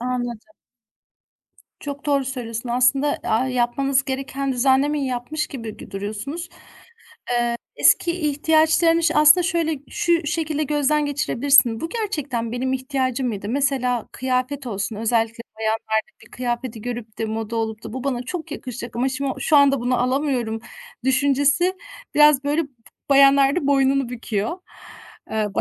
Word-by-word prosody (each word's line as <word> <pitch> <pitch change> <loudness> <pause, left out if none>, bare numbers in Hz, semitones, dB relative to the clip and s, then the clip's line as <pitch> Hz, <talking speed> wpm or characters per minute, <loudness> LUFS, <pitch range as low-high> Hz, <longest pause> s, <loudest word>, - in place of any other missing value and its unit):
Anladım. 245 +2 -4 1.3
Çok 285 0 -7
doğru 280 -2 +2
söylüyorsun, 240 -2 -5
aslında. 260 +4 +2
Aaa, 230 +4 +1
yapmanız 260 +2 +1
gereken 270 0 -3
düzenlemeyi 270 +3 +2
yapmış 255 +5 -3
gibi 230 -6 -7
gö - - -12
duruyorsunuz. 215 - -5
Eee, - - -19 1.2
eski 345 - +4
ihtiyaçlarını 320 +1 +2
ş 330 - +2
aslında, 305 +4 +7
şöyle 325 -2 0
şu 340 -2 +1
şekilde 310 -1 -1
gözden 295 +1 +1
geçirebilirsin: 270 -4 +3
"Bu 325 - -3
gerçekten 295 - -3
benim 260 +2 -1
ihtiyacım 260 -1 -1
mıydı?" 205 -2 -4
Mesela, 255 -3 0
kıyafet 260 +2 -2
olsun, 205 -1 -3
özellikle 225 +1 0 0.2
bayanlarda 220 0 -1
bir - - -21
kıyafeti 240 -2 -4
görüp 235 -3 -6
de 225 - -1
moda 220 +1 -4
olup 220 0 -3
da, - - -7
"Bu 260 +1 -5
bana 250 -3 -1
çok 335 +4 -6
yakışacak 250 -4 -7
ama 255 +3 +1
şim 270 +1 -3
o 265 - -3
şu 305 - +3
anda 275 -2 +5
bunu 245 0 0
alamıyorum." 250 -4 0 0.4
düşüncesi 285 +7 +2 0.4
biraz, 295 -2 +5
böyle, 295 +3 +1
b 280 - -14 0.4
bayanlarda 275 +2 +5
boynunu 275 -2 +2
büküyor. 230 - -3 0.7
Eee, 215 -1 0
265 Hz, 140 wpm, -22 LUFS, 240-290 Hz, 1.3 s, aslında